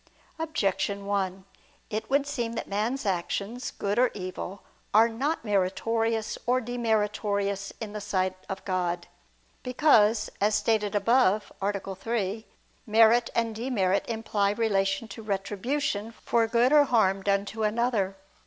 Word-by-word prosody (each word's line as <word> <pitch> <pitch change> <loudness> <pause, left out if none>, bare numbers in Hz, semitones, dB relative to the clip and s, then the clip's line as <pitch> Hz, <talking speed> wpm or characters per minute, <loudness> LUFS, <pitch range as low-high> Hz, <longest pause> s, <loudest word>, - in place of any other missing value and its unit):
Objection 200 - -1
1: 190 -2 -2 0.5
It 220 +1 -3
would 280 +1 +2
seem 240 -5 -3
that - - -4
man's 220 +6 -1
actions, 200 +5 -2
good 205 +3 -2
or 255 0 +5
evil, 185 0 -6 0.3
are 225 +2 +7
not 260 +5 -2
meritorious 220 +3 0
or 250 +1 +3
demeritorious 210 -4 -1
in 215 -2 -6
the 210 - -5
sight 185 -2 0
of 190 0 -5
God. 175 -2 -1 0.6
Because, 245 -5 +3
as 210 +1 +3
stated 210 -2 +1
above 215 -1 +3
(A. 195 -1 -2
3), 220 +1 -3 0.4
merit 225 +2 +5
and 230 -1 +1
demerit 215 -5 0
imply 220 -3 0
relation 200 -1 0
to 210 - -8
retribution 210 +3 -2
for 230 0 +1
good 240 +4 +3
or 295 -1 +7
harm 195 -7 +2
done 200 0 +1
to 220 +2 -6
another. 215 -3 +1
215 Hz, 135 wpm, -27 LUFS, 200-235 Hz, 0.6 s, are